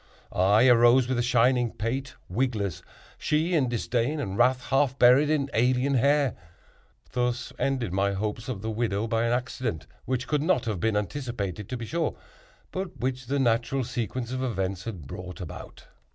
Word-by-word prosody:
I 100 +7 +4
arose 120 +1 +6
with 130 -1 0
a - - +3
shining 120 0 +2
pate, 130 +5 -3
wigless; 105 -3 -1 0.4
she 155 +4 +1
in 140 -7 +2
disdain 120 +4 -1
and 100 -9 -3
wrath, 125 +3 +3
half 135 -1 +2
buried 130 +4 +6
in 150 -3 +1
alien 125 +4 +2
hair. 140 0 +3 0.8
Thus 125 0 -1
ended 125 -9 -1
my 100 +1 +1
hopes 105 +4 -3
of 105 -6 -4
the 110 - -2
widow 110 -2 -1
by 115 0 0
an 115 - +1
accident 120 - -2 0.2
which 130 -1 -1
could 150 -2 +1
not 160 -3 +1
have 105 -5 -2
been 110 +3 +1
anticipated, 105 - -4
to 125 - -3
be 115 - -5
sure, 165 +7 -1 0.6
but 185 -6 -5
which 130 +1 -2
the 140 - 0
natural 120 +1 +1
sequence 120 +1 -3
of 130 0 -2
events 95 -7 -2
had 95 -10 -6
brought 90 +4 -8
about. - - -9
120 Hz, 170 wpm, -27 LUFS, 110-130 Hz, 0.8 s, arose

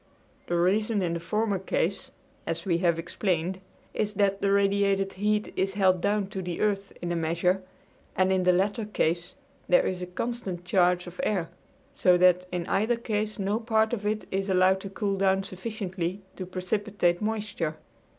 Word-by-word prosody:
The 175 - 0
reason 205 +4 +2
in 170 -2 0
the 170 - -2
former 200 +4 0
case, 195 +6 -1 0.4
as 165 0 -3
we 170 -3 +1
have 170 -2 +2
explained, 180 +1 -2 0.3
is 210 0 -1
that 200 -1 +1
the 200 - +2
radiated 200 -1 +2
heat 210 +2 0
is 195 +1 0
held 185 -3 +3
down 205 +1 +1
to 195 -2 -4
the 175 -2 -4
earth 200 -2 0
in 175 - -2
a - - 0
measure, 170 +3 +1 0.5
and 185 0 +3
in 190 -1 +3
the 180 0 +4
latter 200 +5 +1
case 175 -4 -1 0.3
there - - +5
is 180 -1 -2
a 180 - -4
constant 185 -2 -4
change 180 -1 +3
of 175 0 -11
air; 175 -5 0 0.4
so 180 -1 +4
that 180 0 +4
in 175 -1 -2
either 220 +6 +1
case 215 -2 -2
no 200 +2 0
part 220 -1 +1
of 215 -4 -2
it 215 +1 -1
is 195 +1 -1
allowed 190 0 +4
to 195 - -7
cool 195 0 -2
down 190 0 +2
sufficiently 190 -2 -4
to 185 - -6
precipitate 185 -1 0
moisture. 210 -7 -2
190 Hz, 180 wpm, -27 LUFS, 180-210 Hz, 0.5 s, there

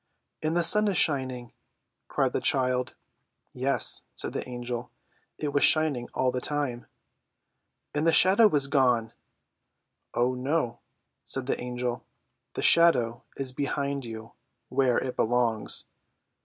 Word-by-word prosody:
"And 155 +2 0
the 175 - +2
sun 210 +5 +3
is 200 - 0
shining!" 130 -5 -1 0.5
cried - - 0
the - - -1
child. 125 -1 +1 0.6
"Yes," 135 +2 +1
said - - -4
the - - -4
Angel; 120 0 -5 0.5
"it 145 -2 -3
was 145 - +2
shining 150 -6 +2
all 130 -1 +2
the 125 0 -3
time." 140 -5 -3 1.1
"And 150 +2 0
the - - +6
shadow 195 +6 +6
is 145 -6 +2
gone!" 125 -5 +2 1.0
"Oh, 125 +1 +2
no!" 125 -1 -1 0.4
said 135 -1 -3
the 135 - -2
Angel; 125 0 -3 0.5
"the - - -3
shadow 125 -8 +4 0.2
is 135 -2 -2
behind 140 0 -2
you, 115 -1 -8 0.4
where 130 -2 +2
it 130 -1 -2
belongs. 115 -2 0
130 Hz, 130 wpm, -27 LUFS, 120-145 Hz, 1.1 s, the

